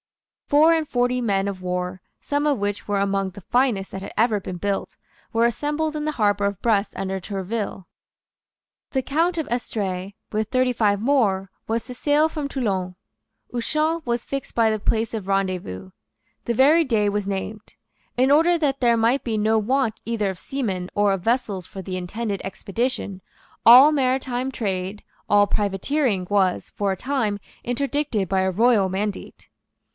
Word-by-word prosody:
Four 310 +3 +5
and 320 -2 -1
forty 245 0 +1
men 200 -4 +1
of 195 -2 -4
war, 180 0 -3 0.2
some 290 +1 -1
of 290 -3 +2
which 205 0 -3
were 205 -1 0
among 195 -1 0
the 190 - -11
finest 230 -1 0
that 195 - -6
had 195 - -7
ever 220 -2 +3
been 180 -1 -6
built, 200 +2 -3 0.3
were 230 0 +3
assembled 295 +6 -1
in 300 - -2
the 305 - -1
harbour 205 -4 +1
of 200 -2 -2
Brest 215 -3 +1
under 190 0 -2
Tourville. 195 -1 -4 1.0
The 265 -1 -1
Count 335 +6 +1
of 320 - -2
Estrees, 200 -5 -3 0.2
with 215 0 -1
thirty 255 -1 +2
five 205 -4 +2
more, 210 -7 +1 0.2
was 225 +1 -1
to 255 - -9
sail 295 +4 +2
from 305 -3 -4
Toulon. 190 -9 -2 0.6
Ushant 310 +7 0
was 235 -1 -1
fixed 275 -1 -5
for 230 -1 +4
the 215 - -1
place 225 +2 0
of 210 -4 -4
rendezvous. 180 - -2 0.5
The 235 - -1
very 295 +7 +5
day 225 -7 +1
was 205 -1 -1
named. 200 +2 -5 0.4
In 260 +2 +4
order 330 +4 +5
that 280 -4 0
there 235 -2 +4
might 235 +5 +2
be 225 -3 -1
no 220 +1 +2
want 235 +1 0
either 215 -4 -1
of 185 - -10
seamen 195 -10 -3
or 205 -1 +3
of 195 - -3
vessels 215 -5 -1
for 195 - -8
the 185 0 -5
intended 200 +3 -3
expedition, 200 0 -3 0.4
all 255 +6 +10
maritime 260 -1 0
trade, 195 -3 -3 0.3
all 205 0 +5
privateering 205 +2 0
was, 195 -3 +1
for 200 -1 -1
a 190 - -2
time, 230 -5 -1 0.2
interdicted 270 -4 -1
by 190 +1 +1
a 190 0 +1
royal 215 -1 +3
mandate. 200 +2 -4
220 Hz, 170 wpm, -23 LUFS, 195-260 Hz, 1.0 s, all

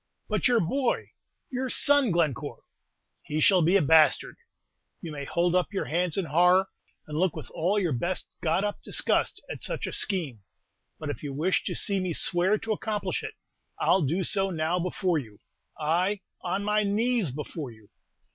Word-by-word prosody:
"But - - +1
your 245 -2 +4
boy, 250 +8 -1 0.4
your 260 0 -2
son, 285 -1 +4
Glencore!" 165 - -1 0.6
"He 150 - -3
shall 185 +3 +5
be 170 +4 +3
a 185 - +2
bastard! 155 +2 +4 0.6
You 165 - -7
may 140 -2 -6
hold 170 +4 +1
up 180 +1 +1
your 195 - -2
hands 175 +1 -1
in 195 - 0
horror, 180 +4 +4 0.4
and 150 - -7
look 185 -2 +1
with 155 -6 -8
all 185 +6 0
your 180 -6 +1
best 170 +9 -2
got 165 +4 +1
up 205 0 -3
disgust - - 0
at - - -7
such - - -3
a - - -5
scheme; 160 - -2 0.6
but 155 -2 -4
if - - -8
you 145 - -5
wish 165 +7 +1
to - - -2
see 200 -3 +1
me 185 -2 -2
swear 180 +6 +2
to 225 +1 -5
accomplish 210 0 -2
it, - - -7 0.4
I'll 190 - +3
do 165 +6 0
so 195 +2 0
now 165 0 0
before 180 -1 0
you, 110 -7 -11 0.4
ay, 180 +6 0 0.2
on 190 +3 -2
my 210 +1 +2
knees 215 - +1
before 150 +1 -6
you! 110 -3 -17
180 Hz, 180 wpm, -27 LUFS, 155-200 Hz, 0.6 s, shall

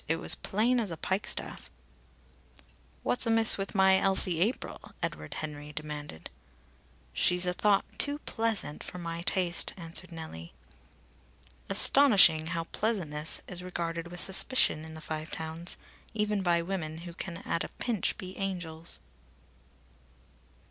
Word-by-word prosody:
It 165 - +2
was 165 - +2
as - - +9
plain 235 +5 +2
as 220 -4 -1
a 165 - -5
pikestaff." 190 +6 -2 1.3
"What's 245 - 0
amiss 225 -1 +8
with 195 +2 -4
my 190 -1 +6
Elsie 190 -3 +3
April?" 220 +7 -2
Edward 75 0 -3
Henry 150 -1 -6
demanded. 150 - -6 0.8
"She's 180 - +2
a 180 - +1
thought 200 +1 +3
too 285 0 +2
pleasant 225 -9 -1
for - - -7
my 170 -1 -4
taste," 175 -1 +1
answered 170 +1 -5
Nellie. 160 - -8 1.2
Astonishing, 195 - +5
how 165 0 -2
pleasantness 165 -6 -2
is 180 -1 -6
regarded 170 -2 -4
with 175 +1 -7
suspicion 190 -4 +2
in 160 0 -9
the 160 - -9
Five 155 +1 -5
Towns, 160 +2 -4 0.4
even 210 -1 +1
by 170 -2 +2
women 170 -4 -3
who 170 - -7
can 170 0 -5
at 165 - -2
a - - -6
pinch 225 -7 -1
be 185 0 -7
angels! 170 -4 -4
175 Hz, 135 wpm, -30 LUFS, 160-195 Hz, 1.3 s, as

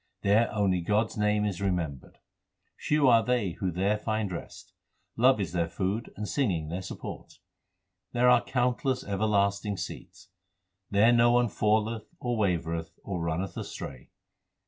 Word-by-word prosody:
There 105 +4 +3
only 95 -4 +1
God 105 +5 +1
s - - -10
name 105 0 +2
is 100 -3 -3
remembered. 85 -9 -3 0.6
Few 150 -2 +2
are 115 -2 +6
they 120 -7 0
who 95 - 0
there 95 +5 0
find 110 -2 -2
rest. 85 - -8 0.4
Love 125 0 +4
is 95 -6 -2
their 85 -1 0
food 100 +6 -2
and 105 0 -4
singing 90 - 0
their 90 +3 -3
support. - - -8 0.7
There 120 +1 +2
are 125 -1 +6
countless 125 +1 0
everlasting 100 0 0
seats. 95 +2 -8 0.6
There 105 +4 +5
no 120 0 +5
one 120 -1 +3
falleth, 110 +2 0
or 120 -1 -1
wavereth, 85 -6 -1
or 90 -4 -4
runneth 85 +3 -2
astray. 65 -2 -7
105 Hz, 145 wpm, -28 LUFS, 90-115 Hz, 0.7 s, are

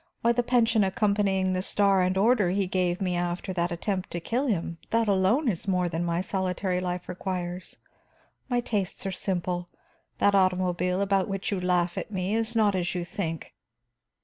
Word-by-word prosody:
Why, 235 - +5
the 240 +1 +2
pension 230 -3 +3
accompanying 195 -1 +1
the 185 - 0
star 195 0 +2
and 185 +1 +1
order 210 -2 +3
he 195 +2 +1
gave 180 -1 0
me 180 -2 0
after 175 +2 -2
that 175 0 -1
attempt 185 +2 -2
to 170 - -4
kill 245 - -1
him, 170 -6 -2
that 230 0 +2
alone 200 +9 +2
is 200 -4 -1
more 180 -2 +1
than 165 0 -2
my 170 0 0
solitary 185 -1 -1
life 180 -1 -3
requires. 180 -1 -4 0.7
My 245 -1 +1
tastes 205 -5 -3
are 195 - -1
simple 180 -2 -2 0.5
that 205 - +3
automobile 185 -1 +2
about 195 -1 +2
which 195 +2 -3
you 195 -2 -1
laugh 180 -1 +1
at - - -6
me 190 -1 -2
is 225 +1 -1
not 215 -3 +4
as 180 -1 -1
you 175 -1 -2
think. 170 -3 -5
185 Hz, 180 wpm, -27 LUFS, 180-205 Hz, 0.7 s, Why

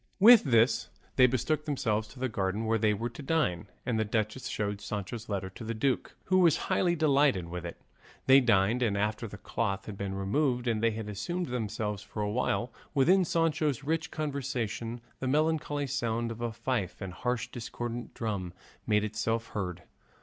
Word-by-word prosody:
With 225 +1 +9
this 115 -1 +3 0.3
they 130 -1 +7
betook 130 +5 0
themselves 110 -7 0
to 130 +3 -9
a - - +3
garden 100 -1 -1
where 110 0 +2
they 110 0 +3
were 115 +3 -2
to 120 - -9
dine, 140 - 0 0.2
and 115 -3 0
the - - +3
duchess 110 +3 -2
showed 105 -1 -2
Sancho's 105 +3 -5
letter 95 -2 -2
to 105 - -9
the 115 +1 -3
duke, 130 +4 0
who 185 0 +3
was 170 -4 +5
highly 175 -2 +3
delighted 140 - +3
with 90 0 -5
it. 85 - -9 0.5
They 135 +1 +8
dined, 115 0 +3
and 105 -5 +1
after 105 +3 -1
the 105 - -9
cloth 100 0 -2
had 100 -2 -8
been 100 -1 -3
removed 125 +5 0
and 110 -2 +1
they 115 - +4
had 110 0 -4
amused 125 - -3
themselves 105 -3 -2
for 105 0 -5
a 105 - -1
while 120 0 0 0.2
with 135 +3 +4 0.2
Sancho's 155 -4 +1
rich 160 +2 -1
conversation, 125 -6 -3 0.2
the 130 - -2
melancholy 150 0 +1
sound 120 -3 -1
of 115 0 -7
a 120 -1 -1
fife 110 -4 -2
and 95 -3 -6
harsh 125 +3 -2
discordant 120 0 -5
drum 100 -6 -3 0.3
made 105 -1 +3
itself 110 +2 -1
heard. 90 -4 -4
115 Hz, 185 wpm, -30 LUFS, 105-135 Hz, 0.5 s, With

